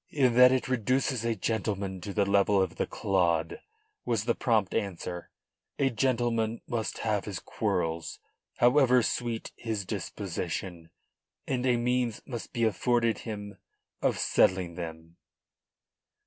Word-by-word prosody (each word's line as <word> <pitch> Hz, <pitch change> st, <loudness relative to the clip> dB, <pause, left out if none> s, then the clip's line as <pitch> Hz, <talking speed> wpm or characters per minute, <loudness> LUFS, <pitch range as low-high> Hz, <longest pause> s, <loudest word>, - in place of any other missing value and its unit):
"In 130 Hz, -5 st, +2 dB
that 125 Hz, +1 st, +8 dB
it 130 Hz, -1 st, +1 dB
reduces 130 Hz, +1 st, 0 dB
a 115 Hz, -1 st, 0 dB
gentleman 100 Hz, -4 st, -2 dB
to 100 Hz, -, -5 dB
the 100 Hz, 0 st, +1 dB
level 100 Hz, 0 st, +3 dB
of 95 Hz, -3 st, 0 dB
the -, -, -1 dB
clod," 85 Hz, -4 st, 0 dB, 0.4 s
was 115 Hz, -4 st, -1 dB
the 120 Hz, -, +2 dB
prompt 110 Hz, -7 st, +1 dB
answer. 90 Hz, -4 st, -3 dB, 0.5 s
"A 135 Hz, -2 st, +2 dB
gentleman 115 Hz, -2 st, 0 dB
must 115 Hz, -2 st, -3 dB
have 105 Hz, -3 st, 0 dB
his 100 Hz, -4 st, -4 dB
quarrels, 80 Hz, 0 st, -2 dB, 0.4 s
however 125 Hz, 0 st, +5 dB
sweet 120 Hz, -1 st, -2 dB
his 110 Hz, -4 st, -3 dB
disposition, 90 Hz, -3 st, -4 dB, 0.6 s
and 130 Hz, 0 st, -1 dB
a 125 Hz, -1 st, +3 dB
means 120 Hz, -1 st, 0 dB
must 120 Hz, -4 st, -6 dB
be 115 Hz, -, -1 dB
afforded 115 Hz, +2 st, +2 dB
him 105 Hz, -2 st, -7 dB, 0.4 s
of -, -, +1 dB
settling 95 Hz, -2 st, +2 dB
them." 80 Hz, -1 st, -8 dB
110 Hz, 135 wpm, -29 LUFS, 95-120 Hz, 0.6 s, that